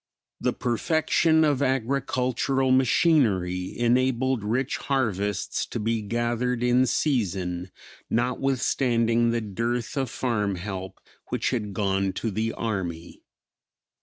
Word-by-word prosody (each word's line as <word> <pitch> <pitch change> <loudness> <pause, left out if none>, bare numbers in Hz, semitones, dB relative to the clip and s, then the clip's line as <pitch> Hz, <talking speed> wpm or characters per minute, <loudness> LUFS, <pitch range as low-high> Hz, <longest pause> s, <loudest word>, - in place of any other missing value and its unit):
The - - 0
perfection 160 +5 +2
of 145 -3 +2
agricultural 130 0 0
machinery 115 - +2
enabled 125 0 +1
rich 120 +5 -1
harvests 105 -7 -1
to - - -4
be 115 +1 0
gathered 120 +3 -1
in 125 +1 +3
season 95 - -1 0.4
notwithstanding 120 -1 +1
the 115 0 0
dearth 115 +5 -2
of 135 -3 0
farm 105 -6 -1
help 95 +1 -6 0.3
which - - -1
had 105 -6 -3
gone 95 -2 0
to 115 - -3
the 110 +3 -1
army. 90 -7 -4
120 Hz, 105 wpm, -25 LUFS, 105-130 Hz, 0.4 s, in